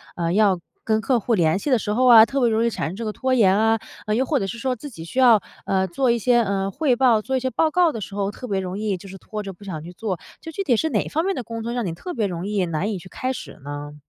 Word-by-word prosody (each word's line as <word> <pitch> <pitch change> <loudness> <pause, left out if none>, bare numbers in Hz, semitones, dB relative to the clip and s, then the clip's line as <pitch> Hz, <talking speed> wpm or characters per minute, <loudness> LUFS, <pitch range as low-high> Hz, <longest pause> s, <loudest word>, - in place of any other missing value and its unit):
呃， 170 -1 -1
要 200 -4 +3 0.3
跟 220 -1 +2
客 245 +3 +2
户 230 +2 -1
联 165 -2 +2
系 295 - -3
的 255 - +4
时 210 - -3
候 255 +3 +2
啊， 225 -3 +9
特 275 +4 -2
别 240 - +4
容 220 +1 +1
易 - - +3
产 220 - -3
生 180 - -7
这 230 - -5
个 215 - -2
拖 260 +2 -1
延 200 -6 +4
啊， 225 +1 +3 0.3
呃， 210 - 0
又 260 - +1
或 285 +1 +1
者 195 - -2
是 195 - -5
说 255 +2 -1
自 270 +5 -9
己 165 -11 -10
需 210 - -10
要， 235 -5 +6 0.2
呃， 190 -1 +1
做 250 +8 +1
一 235 - +2
些， 240 +2 +3
呃， 195 -2 -1
汇 280 -1 +1
报， 240 -4 +4
做 265 +4 -1
一 - - 0
些 260 +1 -1
报 310 +6 +1
告 350 0 +3
的 225 - -6
时 195 +1 -7
候， 200 0 -1
特 250 - -9
别 195 -3 -1
容 185 +1 -4
易 210 -3 -1
就 195 - -12
是 195 - -9
拖 210 +2 -6
着 195 -1 -6
不 175 - -17
想 170 -6 -5
去 175 +2 -10
做， 190 -3 -3 0.2
就 325 - -8
具 395 +5 -3
体 255 -10 +3
是 320 - 0
哪 220 -8 +1
一 - - -9
方 320 +2 0
面 390 0 0
的 250 - -4
工 230 0 -6
作， 235 - -3
让 240 -2 -2
你 170 - -2
特 355 - -7
别 215 -5 0
容 175 +1 -4
易 205 -3 0
难 170 +6 -2
以 200 - -3
去 185 - -13
开 255 +1 -3
始 - - -9
呢？ 145 +1 -6
220 Hz, 350 characters per minute, -23 LUFS, 195-250 Hz, 0.3 s, 啊